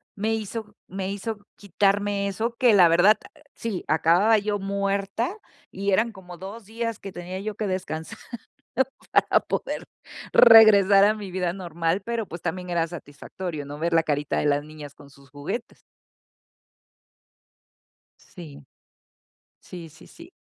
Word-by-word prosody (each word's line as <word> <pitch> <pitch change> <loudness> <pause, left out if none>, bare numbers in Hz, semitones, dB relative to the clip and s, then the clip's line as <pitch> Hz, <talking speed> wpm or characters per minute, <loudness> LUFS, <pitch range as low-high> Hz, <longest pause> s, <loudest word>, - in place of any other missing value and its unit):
me 220 +2 -1
hizo 215 0 -6
me 190 +1 -4
hizo 210 +2 -4 0.2
quitarme 200 +1 0
eso, 225 +4 -3
que 245 -4 +4
la 180 -4 +7
verdad, 175 +6 +5 0.4
sí, 220 -6 -4
acababa 175 +8 +4
yo 205 0 -2
muerta 200 - -2 0.4
y 200 +1 -2
eran 225 +4 +2
como 180 -3 -12
2 200 +4 -9
días 230 0 -4
que 195 - -8
tenía 180 +2 -7
yo 210 +1 -5
que 215 - -3
descansar 160 -4 -4 0.9
para - - +4
poder - - -4 0.5
regresar 205 -4 +8
a 210 - +4
mi 200 -3 -8
vida 180 -2 -1
normal, 170 0 -2
pero 230 0 -3
pues 170 +1 -8
también 180 +1 -4
era 170 -1 0
satisfactorio, 155 0 -7
¿no? 145 +1 -8
Ver 170 +1 -1
la 165 0 +4
carita 145 -2 -1
de - - -1
las 145 0 +1
niñas 150 -2 -11
con 140 -1 -16
sus 140 -1 -20
juguetes. 145 - -6 2.4
Sí. 145 -6 -13 0.9
Sí, 170 -3 -10
sí, - - -17
sí. 335 +2 -15
195 Hz, 145 wpm, -24 LUFS, 165-210 Hz, 2.4 s, regresar